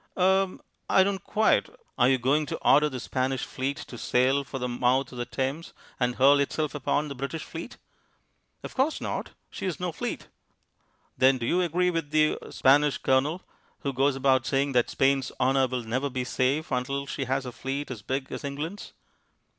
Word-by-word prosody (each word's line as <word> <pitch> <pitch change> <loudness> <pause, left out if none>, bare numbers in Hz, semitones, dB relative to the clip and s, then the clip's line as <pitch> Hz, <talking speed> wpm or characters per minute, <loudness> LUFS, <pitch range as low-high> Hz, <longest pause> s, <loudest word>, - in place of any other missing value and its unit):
"Er 190 0 +2 0.3
I 190 - +6
don't 195 0 -2
quite 215 +1 +2
" - - -42
"Are 125 0 +5
you 135 - +4
going 140 +5 +1
to - - -3
order 150 +2 +6
the 130 -3 -5
Spanish 130 +1 -2
Fleet 135 +2 -3
to 120 - -9
sail 130 +3 +2
for 135 0 -6
the 125 -1 -2
mouth 125 +2 +1
of 125 - -8
the 120 - -3
Thames, 135 +6 -3 0.3
and 125 -1 +1
hurl 140 +2 +5
itself 150 +2 -1
upon 145 +1 0
the 140 - -5
British 140 +4 -5
fleet?" 165 +8 -8 0.9
"Of - - -7
course 275 +4 +1
not, - - -4 0.2
She - - -6
has 185 -4 -2
no 180 -1 -2
fleet." - - -5 0.9
"Then 130 0 +5
do 120 - -4
you 180 +8 +2
agree 180 +1 +1
with 165 -3 -2
the 155 0 +3
er - - -11
Spanish 145 +2 +4
Colonel, 145 +7 +1 0.4
who 140 - -2
goes 135 +2 +2
about 135 -1 +2
saying 140 +1 +1
that 125 -2 +2
Spain's 135 -1 +1
honour 130 +1 +3
will 125 -1 -3
never 130 +5 -1
be 125 -1 -2
safe 130 +5 0
until 140 +2 -1
she 135 0 -4
has 135 +1 -1
a 125 - -5
fleet 135 +3 -4
as 115 -5 -6
big 135 +4 -3
as - - -5
England's?" 150 +8 -5
135 Hz, 195 wpm, -27 LUFS, 130-150 Hz, 0.9 s, I